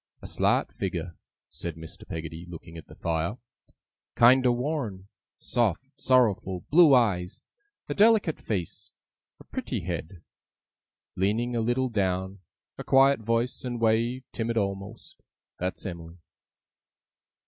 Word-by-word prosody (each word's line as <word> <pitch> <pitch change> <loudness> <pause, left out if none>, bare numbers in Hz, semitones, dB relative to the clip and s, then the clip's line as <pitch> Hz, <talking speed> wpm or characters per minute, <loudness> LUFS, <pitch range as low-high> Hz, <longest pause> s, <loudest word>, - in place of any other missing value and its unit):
A - - -13
slight - - +1
figure,' 90 -2 -4 0.4
said 85 -2 -6
Mr. 80 +3 -11
Peggotty, 80 0 -6
looking 85 -1 -10
at 80 - -10
the - - -14
fire, 85 +6 -2 0.8
'kiender 125 +1 +6
worn; 120 -7 -3 0.3
soft, 120 - -1
sorrowful, 110 -7 +2
blue 155 -3 +7
eyes; 95 -7 +1 0.5
a - - -2
delicate 210 -6 +4
face; 105 +1 -4 0.5
a - - -13
pritty - - -4
head, 85 +1 -6 0.9
leaning 110 +6 0
a 115 - +1
little 120 +3 +1
down; 95 -2 -1 0.4
a - - -4
quiet 135 0 +5
voice 115 +4 -1
and 120 -2 -4
way 115 +3 +1
timid 115 0 -2
a'most. 100 +1 -4 0.4
That's 90 +3 -4
Em'ly! 85 -2 -7
105 Hz, 120 wpm, -27 LUFS, 90-120 Hz, 0.9 s, blue